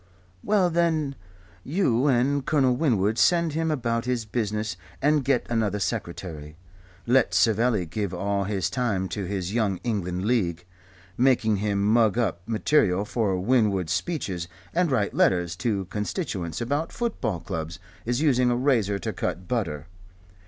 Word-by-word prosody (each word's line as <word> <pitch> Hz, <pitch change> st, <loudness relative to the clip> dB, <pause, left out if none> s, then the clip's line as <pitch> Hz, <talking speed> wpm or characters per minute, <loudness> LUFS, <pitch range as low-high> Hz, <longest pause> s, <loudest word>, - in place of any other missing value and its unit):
Well, 195 Hz, -4 st, +2 dB
then 160 Hz, -4 st, +1 dB, 0.5 s
you 140 Hz, -, +1 dB
and 135 Hz, +2 st, +2 dB
Colonel 130 Hz, -4 st, +2 dB
Winwood 115 Hz, -6 st, +1 dB
send 170 Hz, -1 st, +3 dB
him 160 Hz, +1 st, 0 dB
about 115 Hz, -6 st, -1 dB
his 125 Hz, -3 st, -1 dB
business 105 Hz, -2 st, -2 dB, 0.2 s
and 150 Hz, 0 st, +2 dB
get 130 Hz, -2 st, +1 dB
another 110 Hz, -3 st, 0 dB
secretary. 85 Hz, -7 st, -4 dB, 0.5 s
Let 125 Hz, +1 st, +3 dB
Savelli 110 Hz, -3 st, +3 dB
give 100 Hz, +3 st, -3 dB
all 100 Hz, +2 st, -1 dB
his 100 Hz, -2 st, -1 dB
time 105 Hz, -7 st, 0 dB
to 100 Hz, -3 st, -3 dB
his 95 Hz, 0 st, -3 dB
Young 105 Hz, -5 st, +1 dB
England 95 Hz, -5 st, -2 dB
League. 90 Hz, -8 st, 0 dB, 0.5 s
Making 120 Hz, -5 st, +3 dB
him 100 Hz, 0 st, 0 dB
mug 110 Hz, 0 st, +3 dB
up 95 Hz, -8 st, 0 dB
material 105 Hz, -4 st, +2 dB
for 105 Hz, -4 st, 0 dB
Winwood's 100 Hz, -6 st, +2 dB
speeches 95 Hz, -, -3 dB, 0.3 s
and 175 Hz, 0 st, +2 dB
write 110 Hz, -7 st, 0 dB
letters 90 Hz, -2 st, +2 dB
to 100 Hz, -5 st, -1 dB
constituents 105 Hz, -, -3 dB
about 145 Hz, +7 st, -1 dB
football 215 Hz, -, -2 dB
clubs 80 Hz, -1 st, -5 dB, 0.3 s
is 120 Hz, +4 st, -1 dB
using 125 Hz, -5 st, +3 dB
a 120 Hz, -, +2 dB
razor 120 Hz, -7 st, +2 dB
to 95 Hz, -, -4 dB
cut 90 Hz, 0 st, -3 dB
butter. 80 Hz, -, -2 dB
110 Hz, 145 wpm, -25 LUFS, 95-130 Hz, 0.5 s, send